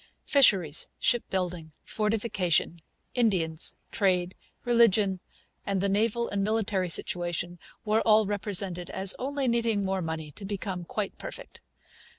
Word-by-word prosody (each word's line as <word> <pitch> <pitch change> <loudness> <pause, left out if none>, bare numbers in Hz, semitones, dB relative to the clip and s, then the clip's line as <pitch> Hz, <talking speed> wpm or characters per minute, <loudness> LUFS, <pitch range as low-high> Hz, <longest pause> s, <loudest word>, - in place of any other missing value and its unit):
Fisheries, 190 - +4
shipbuilding, 180 -8 -1
fortification, 210 -6 0 0.3
Indians, 180 -9 +1 0.2
trade, 185 -2 +1 0.3
religion, 215 -5 +3 0.5
the 195 0 0
naval 225 +4 +1
and 200 -1 -1
military 205 -3 0
situation, 175 +1 -1 0.3
were 215 +1 +2
all 215 -1 +4
represented 195 -3 -1
as 190 +1 0
only 275 +1 -2
needing 230 -4 +1
more 190 0 -1
money 160 -2 -4
to 195 - -10
become 195 -2 -4
quite 205 +3 -3
perfect. - - -9
195 Hz, 115 wpm, -28 LUFS, 180-220 Hz, 0.5 s, Fisheries